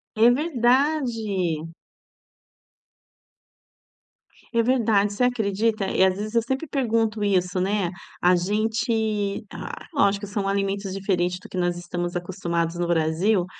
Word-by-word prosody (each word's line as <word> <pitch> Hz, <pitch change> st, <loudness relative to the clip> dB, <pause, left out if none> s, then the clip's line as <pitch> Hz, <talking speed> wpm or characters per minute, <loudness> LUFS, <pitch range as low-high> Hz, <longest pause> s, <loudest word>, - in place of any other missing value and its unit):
É 225 Hz, +2 st, +6 dB
verdade. 240 Hz, -, +1 dB, 2.8 s
É 230 Hz, -, +4 dB
verdade, 220 Hz, -4 st, +2 dB
você 225 Hz, -, 0 dB
acredita? 220 Hz, -3 st, +1 dB
E -, -, +3 dB
às 190 Hz, 0 st, +3 dB
vezes 215 Hz, +2 st, -5 dB
eu 230 Hz, -, +5 dB
sempre 265 Hz, +7 st, -3 dB
pergunto 225 Hz, -6 st, 0 dB
isso, 185 Hz, -2 st, +1 dB
né, 195 Hz, -1 st, 0 dB, 0.3 s
a 180 Hz, +1 st, +5 dB
gente, 215 Hz, +2 st, 0 dB
ah, -, -, -8 dB
lógico 200 Hz, -8 st, +2 dB
que 200 Hz, -, -11 dB
são 205 Hz, -1 st, -2 dB
alimentos 195 Hz, 0 st, -1 dB
diferentes 180 Hz, -2 st, 0 dB
do -, -, -12 dB
que -, -, -7 dB
nós 175 Hz, -1 st, 0 dB
estamos 175 Hz, 0 st, -3 dB
acostumados 170 Hz, -2 st, -2 dB
no 175 Hz, 0 st, -1 dB
Brasil, 170 Hz, +4 st, +2 dB
200 Hz, 130 wpm, -24 LUFS, 180-225 Hz, 2.8 s, É